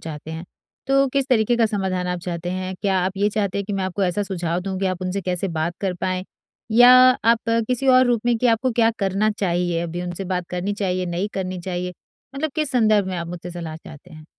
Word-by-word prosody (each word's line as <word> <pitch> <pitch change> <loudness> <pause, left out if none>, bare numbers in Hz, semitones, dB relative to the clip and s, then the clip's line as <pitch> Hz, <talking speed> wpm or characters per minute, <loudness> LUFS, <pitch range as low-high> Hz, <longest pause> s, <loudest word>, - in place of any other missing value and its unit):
चाहते 155 -1 -8
हैं 160 +1 -6 0.4
तो 275 0 +3
किस 275 0 0
तरीके 235 -1 +3
का 230 -1 +3
समाधान 190 -3 -2
आप 180 0 -2
चाहते 175 -1 -4
हैं? 185 0 -3
क्या 195 -2 +2
आप 185 +1 -1
ये 205 +1 +2
चाहते 200 -2 -1
हैं 200 - -2
कि 205 - -5
मैं 195 -1 -1
आपको 190 +2 -2
ऐसा 185 +3 0
सुझाव 175 -3 -2
दूँ 190 0 -4
कि 195 - +1
आप 185 0 -2
उनसे 185 +2 -2
कैसे 180 +1 -1
बात 165 +1 -2
कर 190 -2 -1
पाएँ? 185 0 -1 0.5
या 245 +3 +7 0.3
आप 230 0 +5 0.3
किसी 255 +2 0
और 255 0 +6
रूप 240 -3 +2
में 240 -1 +3
कि 250 - +2
आपको 235 +3 +2
क्या 225 0 +3
करना 200 +2 +1
चाहिए, 175 -4 -1
अभी 170 +1 -4
उनसे 180 +2 -4
बात 180 -1 -2
करनी 180 +3 -2
चाहिए, 185 -3 -1
नहीं 175 +4 -2
करनी 185 -1 -3
चाहिए? 180 0 -4 0.4
मतलब 310 +3 -2
किस 305 -3 0
संदर्भ 215 -5 +3
में 185 -1 -3
आप 170 - -4
मुझसे 175 +1 -7
सलाह 165 -2 -6
चाहते 160 +2 -14
हैं? 155 0 -12
185 Hz, 235 wpm, -22 LUFS, 175-215 Hz, 0.5 s, या